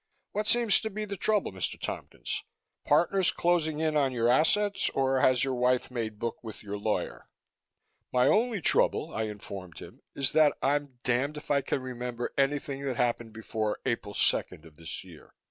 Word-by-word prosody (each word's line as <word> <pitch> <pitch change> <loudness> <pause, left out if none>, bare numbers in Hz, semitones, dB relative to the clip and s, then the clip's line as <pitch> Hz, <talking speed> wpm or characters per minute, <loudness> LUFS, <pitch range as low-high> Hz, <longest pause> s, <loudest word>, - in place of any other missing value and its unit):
What 210 +1 -2
seems 235 -3 +5
to 220 - -4
be 215 +1 -4
the 200 -1 -5
trouble, 210 +1 +1
Mr. 95 -1 -3
Tompkins? - - -5 0.4
Partners 175 +5 +3
closing 160 -3 +1
in 155 -1 +1
on 140 -3 +3
your 120 -2 +1
assets 195 +9 +3
or 135 -1 +2
has 130 0 +4
your 135 -1 0
wife 125 0 +1
made 110 -3 -3
book 115 +2 -4
with 110 -2 -9
your 100 0 -5
lawyer?" 105 +1 -3 0.8
"My 125 0 +3
only 225 -2 +2
trouble," - - +2
I 110 - -1
informed 100 -5 -8
him, - - -11
"is 135 -1 +1
that 155 -2 +4
I'm 140 -1 -1
damned 130 +5 0
if 150 - -6
I 140 -1 +3
can 130 - -2
remember 125 -1 -4
anything 140 0 0
that 135 -3 -2
happened 120 -2 -1
before 110 -1 -2
April 115 -5 -2
second 75 - +1
of 80 -2 -15
this 80 +1 -7
year. - - -16
130 Hz, 180 wpm, -29 LUFS, 115-155 Hz, 0.8 s, seems